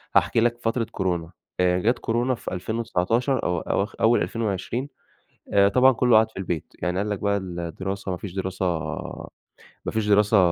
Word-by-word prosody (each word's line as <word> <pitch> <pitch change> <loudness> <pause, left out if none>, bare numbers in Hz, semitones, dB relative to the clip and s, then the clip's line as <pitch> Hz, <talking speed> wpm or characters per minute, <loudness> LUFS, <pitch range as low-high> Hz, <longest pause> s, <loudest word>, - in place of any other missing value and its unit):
هاحكي - - +4
لك 120 0 +2
فترة 115 +1 0
كورونا. 90 -3 -2 0.3
آآ 90 0 +3
جات 115 +6 +1
كورونا 120 +3 0
في - - -7
2019 115 +5 0
أو 90 -1 0
أواخ 100 +5 -1
أول 115 +2 +4
2020 115 +5 -2 0.6
آآ 100 0 +6
طبعًا 130 +4 +6
كله 120 -2 +4
قعد 110 0 +3
في - - -15
البيت، 85 -4 -4
يعني 90 0 -1
قال 105 +2 -1
لك 105 - -2
بقى 100 0 +1
الدراسة 95 +2 -4
ما 90 - -2
فيش 95 -2 -7
دراسة 95 0 -2 1.2
ما - - -1
فيش 110 -1 -1
دراسة 105 +1 +4
100 Hz, 170 wpm, -24 LUFS, 95-115 Hz, 1.2 s, آآ